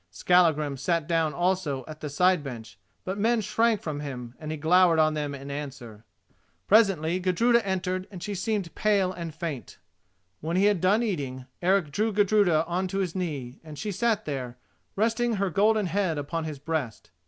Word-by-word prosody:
Skallagrim 155 - +2
sat 160 +3 -1
down 165 -2 +1
also 175 -7 -1
at 155 0 -10
the 150 - -4
side 180 +2 +2
bench; 120 -5 -8 0.3
but 190 +2 -3
men 230 +2 +2
shrank 220 +1 +1
from 150 -3 -4
him, 125 -5 -6
and 155 - -7
he 155 - -3
glowered 170 +2 +4
on 155 -1 +3
them 145 -2 -3
in 140 +1 -8
answer. 130 -7 -7 0.6
Presently 185 -5 +3
Gudruda 230 +7 +2
entered, 185 -1 -2
and 185 -3 -9
she 205 - -3
seemed 195 -3 -2
pale 200 -3 +2
and 170 -3 -6
faint. 155 -4 -6 0.6
When 165 +3 -2
he 195 - +4
had 205 -5 +2
done 205 +5 +3
eating, 135 - -3 0.2
Eric 180 -4 +2
drew 215 +8 0
Gudruda 200 -6 +3
on 180 +2 -1
to 195 +2 -4
his 185 -4 -1
knee, 145 -9 -4
and 155 -2 -10
she 210 +5 -3
sat 225 +2 0
there, 130 -4 -5 0.4
resting 230 +3 +1
her 195 -3 -1
golden 210 +4 +3
head 180 -2 0
upon 160 +3 -3
his 155 -2 -5
breast. 145 - -4
175 Hz, 180 wpm, -26 LUFS, 150-195 Hz, 0.6 s, glowered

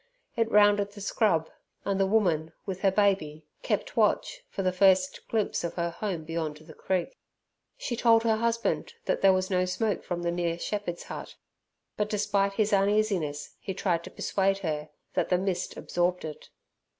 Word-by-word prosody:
It 230 -1 +1
rounded 205 -1 +4
the 205 - -10
scrub, 195 -5 +1 0.4
and 195 -1 0
the 195 - +3
woman, 175 -7 +1
with 190 -1 -4
her 195 - +5
baby, 190 -7 +1 0.2
kept - - -2
watch - - +1
for 195 - -3
the 185 - +2
first 190 +7 +3
glimpse 220 -5 0
of 170 - -3
her 170 -1 -1
home 175 -2 -3
beyond 160 -2 -3
the 155 +1 -14
creek. 190 - -2 0.6
She 240 - -3
told 230 -1 +4
her 225 -1 +2
husband 230 - -1
that - - 0
there 195 - +7
was 185 0 0
no 185 0 +2
smoke 200 +3 -1
from 175 -1 -3
the 170 - +1
nearer 170 -1 -1
shepherd's 175 -1 -3
hut, - - -8 0.6
but 210 0 0
despite 200 -1 +1
his 210 +1 +1
uneasiness 195 -7 +1
he 190 - -5
tried 175 -3 0
to - - -7
persuade 195 0 0
her 150 -1 -2 0.2
that - - 0
the 180 - +4
mist 185 -1 -2
absorbed 175 0 -1
it. 155 -1 -8
195 Hz, 175 wpm, -28 LUFS, 170-210 Hz, 0.6 s, there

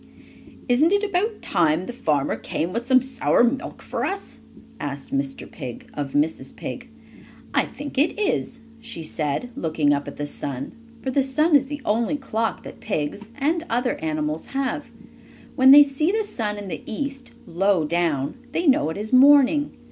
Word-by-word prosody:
"Isn't 275 +7 +4
it 405 +1 +3
about 415 +2 -1
time 160 +3 +2
the 245 - -6
farmer 145 - 0
came 165 +9 -3
with 235 +1 -3
some 260 -1 +5
sour 260 -2 +2
milk 255 +3 -1
for - - -3
us?" 395 0 -4 0.4
asked 140 -1 -5
Mr. 135 0 -2
Pig 125 -6 -9
of 145 -2 -4
Mrs. 150 +2 -1
Pig. - - -7 0.6
"I - - +2
think 285 -2 -5
it 300 - +2
is," 405 - 0 0.2
she 230 -8 -6
said, 155 - -2
looking 155 -3 +1
up 140 0 -2
at - - -8
the 145 - -3
sun, 140 -2 -5 0.3
for 265 - -1
the 275 - +3
sun 300 +4 +2
is 275 -1 +4
the 290 -1 -6
only 230 +6 +1
clock 230 -5 -2
that - - -10
pigs, 205 +3 -3
and 315 +4 0
other 245 +2 +1
animals, 155 0 -2
have. 275 -1 -2 0.6
When 260 0 +6
they 290 +2 +11
see 285 +3 0
the 440 +1 +1
sun 215 - -3
in 205 -1 -7
the 165 - -5
east, 270 +2 -5
low 185 -1 +1
down, 160 - -1
they 345 - 0
know 260 - +4
it 160 - -5
is 215 +4 -4
morning. 285 +2 +5
235 Hz, 175 wpm, -23 LUFS, -, 0.6 s, they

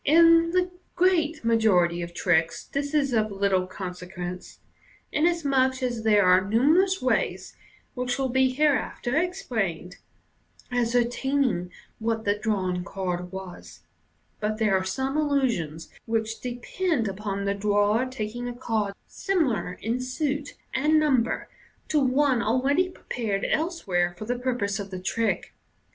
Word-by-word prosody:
In 330 +2 +6
the 365 +1 +1 0.2
great 330 -6 +2
majority 185 -7 +3
of 170 0 -5
tricks 165 -3 +1
this 285 +2 -3
is 275 -4 +2
of 215 -1 +2
little 195 -2 +1
consequence, 180 -1 -7 0.5
inasmuch 280 -5 +1
as 240 -3 -1
there 210 -3 +4
are 185 +1 +5
numerous 310 - +3
ways 255 - 0 0.4
(which 250 0 -2
will 270 -1 0
be 260 +1 +3
hereafter 275 -2 0
explained) 230 - -2 0.7
of 245 - +1
ascertaining 245 -3 +1 0.3
what 225 0 -1
the 205 - +3
drawn 190 -4 -1
card 180 -1 -4
was 190 -2 -9 0.6
j 210 - -1
out 215 0 -2
there 215 -3 +2
are 190 - +1
some 265 +9 -2
illusions 235 - 0 0.2
which 225 0 -2
depend 250 - -1
upon 200 0 -3
the 200 - +1
drawer 205 +4 +2
taking 245 -1 -5
a 245 - -5
card 220 -5 -2
similar 265 - -1
in 230 +4 -1
suit 285 +3 -2 0.2
and 305 +3 +3
number 265 -6 +1 0.4
to 305 - +3
one 265 -1 +2
already 270 +11 +2
prepared 220 - -3
elsewhere 190 - 0
for 215 - -6
the 245 +2 -2
purpose 240 -5 -1
of 200 -1 -5
the 185 - -6
trick. 200 0 -1
235 Hz, 135 wpm, -26 LUFS, 195-280 Hz, 0.7 s, In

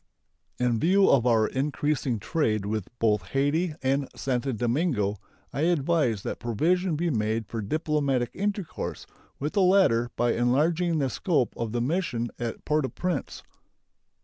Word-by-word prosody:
In 120 -2 +1
view 190 - +4
of 125 -3 +4
our 110 -2 +4
increasing 140 -1 -1
trade 110 - 0
with 105 -2 -2
both 105 -3 +2
Hayti 145 - 0
and 135 +1 +1
Santo 135 0 -1
Domingo, 120 - 0 0.4
I 140 - -2
advise 145 - +1
that - - -4
provision 165 - +1
be 170 +2 0
made 110 -1 0
for 115 +2 -5
diplomatic 140 0 0
intercourse 200 -2 -3 0.3
with 150 +4 -3
the 200 - +2
latter 180 -12 +4
by 120 -1 +2
enlarging 155 +8 +2
the 135 -4 0
scope 150 -6 0
of 115 -2 -3
the 120 +1 -1
mission 125 -5 -1
at 120 -2 -5
Port 150 0 +1
au - - -3
Prince. 180 -6 -3
135 Hz, 145 wpm, -26 LUFS, 115-160 Hz, 0.4 s, view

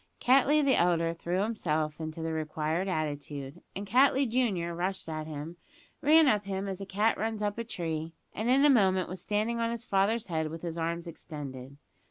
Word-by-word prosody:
Cattley 275 +4 +4
the 270 - +4
elder 170 -1 +2
threw 175 +3 -1
himself 155 -9 -1
into 160 +1 -5
the 160 0 -2
required 160 +3 -1
attitude; 150 -2 -4
and 200 - -4
Cattley 265 +5 +4
junior, 210 -8 0
rushed 185 +2 -3
at 155 -1 -4
him, 155 +3 -6 0.4
ran 310 +1 +6
up 210 -5 +2
him 195 0 -3
as 195 0 -5
a 195 - -6
cat 210 +4 +1
runs 220 -1 -2
up 205 +2 -1
a - - -1
tree, 165 -6 -4 0.2
and 220 +3 -2
in 270 +3 +5
a - - +7
moment 190 -6 +3
was 185 +1 -6
standing 215 +3 -1
on 230 0 +1
his 235 0 -4
father's 205 +2 +1
head 160 -3 -1
with 165 +1 -8
his 170 -2 -3
arms 170 +1 -2
extended. 140 -5 -8
185 Hz, 195 wpm, -29 LUFS, 160-220 Hz, 0.4 s, a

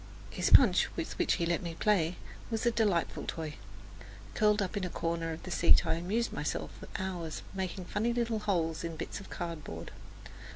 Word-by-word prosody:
His 175 - 0
punch, 205 -9 +7
with 165 - -3
which - - +3
he 170 - 0
let 170 0 +1
me 170 -2 -5
play, 180 -4 +2 0.3
was 225 0 -1
a 235 - +5
delightful 205 -7 +1
toy. 160 -2 -4 0.8
Curled 210 0 +3
up 195 -3 -1
in 200 - -1
a 180 - -1
corner 165 -1 -2
of 160 - -7
the 185 - -7
seat 170 0 +5
I 160 - +2
amused 195 +8 -1
myself - - -2
for - - -10
hours 175 -4 -4
making 190 -1 -3
funny 220 +6 0
little 235 -2 0
holes 170 -7 0
in 165 -1 -4
bits - - -5
of 200 - -11
cardboard. 155 - -6
180 Hz, 190 wpm, -31 LUFS, 165-210 Hz, 0.8 s, punch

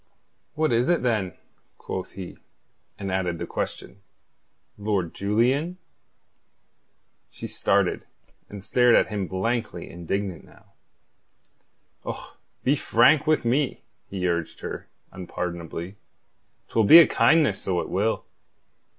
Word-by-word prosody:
"What 155 0 +1
is 120 +4 +2
it, 175 -5 +2
then?" 105 -8 0 0.4
quoth 95 0 -6
he, 95 -2 -8 0.6
and 100 -2 -4
added 90 -2 -1
the - - -4
question: 95 +2 -5 0.7
"Lord 100 -5 -1
Julian?" 125 - +1 1.5
She - - -9
started, - - 0 0.4
and 100 -2 -9
stared 125 +2 +4
at - - +3
him 100 -3 -2
blankly 115 +6 -2
indignant 90 +1 -4
now. - - -21 1.3
"Och, - - -7 0.3
be 135 - +3
frank 150 +1 +4
with 155 -5 +2
me," 130 +4 0 0.3
he 95 -2 -2
urged 85 -2 -2
her, - - -6 0.2
unpardonably. 90 +1 -6 0.7
"'Twill 110 - +2
be 155 - +10
a 170 - +10
kindness, 155 -12 +3
so 90 -2 -1
it - - -3
will." 105 +4 0
100 Hz, 115 wpm, -25 LUFS, 90-125 Hz, 1.5 s, be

